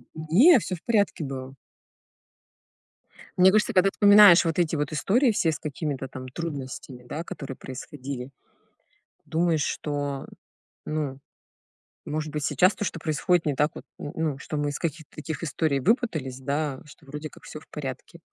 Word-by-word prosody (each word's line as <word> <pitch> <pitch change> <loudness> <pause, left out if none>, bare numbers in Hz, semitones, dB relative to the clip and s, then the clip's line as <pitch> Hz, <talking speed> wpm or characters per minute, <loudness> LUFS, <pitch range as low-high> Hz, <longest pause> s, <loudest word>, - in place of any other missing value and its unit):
Не 175 - +6
всё 185 -1 -4
в 170 - -14
порядке 205 -8 +1
было. 135 -1 -6 1.8
Мне 185 +1 +7
кажется, 215 +1 +2
когда 190 +1 +5
вспоминаешь 205 -4 +8
вот 165 +1 0
эти 165 -2 +1
вот 145 -2 -2
истории, 220 - +3
все 165 -5 +1
с 155 - -5
какими-то 145 -2 -4
там 130 0 -8
трудностями, 135 -4 -6
да, 150 +7 -5
которые 135 -5 -7
происходили, 130 0 -7 0.9
думаешь, 165 -2 +1
что, 145 -2 -3 0.6
ну, 145 -3 -3 0.9
может 155 0 -3
быть, 150 -1 -3
сейчас 180 +8 +3
то, - - -4
что 165 - -4
происходит, 165 +2 +1
не 145 -3 0
так 150 +3 +2
вот, - - -8 0.2
н 145 - -5
ну, 160 -1 0
ну, 135 - -11
что 150 - -5
мы 145 0 0
из 145 - -5
каких-то 155 -2 -5
таких 155 0 -5
историй 150 -2 0
выпутались, 155 - 0
да, 140 0 -2
что 150 0 -16
вроде 150 +2 -6
как - - -17
всё 155 - -8
в - - -20
порядке. 140 +3 -7
150 Hz, 165 wpm, -26 LUFS, 140-170 Hz, 1.8 s, вспоминаешь